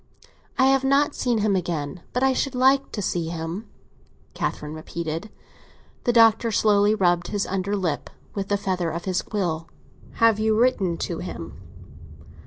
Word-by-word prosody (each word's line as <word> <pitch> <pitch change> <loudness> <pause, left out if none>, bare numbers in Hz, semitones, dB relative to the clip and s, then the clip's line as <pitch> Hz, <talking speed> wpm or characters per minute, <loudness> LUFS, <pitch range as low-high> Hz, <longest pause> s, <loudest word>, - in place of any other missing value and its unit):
I 260 - +5
have 270 0 +4
not 280 +2 +3
seen 245 -2 0
him 205 -2 +2
again, 165 -3 -3
but 250 - 0
I 265 0 +4
should 270 0 -1
like 265 +2 +3
to 205 - -3
see 170 -2 -1
him," 165 +5 -5 0.6
Catherine 150 0 -3
repeated. 160 +4 -5 0.8
The 240 - +4
Doctor 230 0 +5
slowly 210 0 +3
rubbed 175 -3 +2
his 205 -1 -1
under 195 +2 -1
lip 175 -7 -2 0.2
with 195 -1 -3
the 205 - +1
feather 185 -4 -1
of 170 +2 -5
his 185 -1 0
quill. 170 -6 -2 0.5
"Have 225 -2 +3
you 220 0 +2
written 200 -9 +2
to 170 - -4
him?" 85 - -6
200 Hz, 160 wpm, -24 LUFS, 170-230 Hz, 0.8 s, I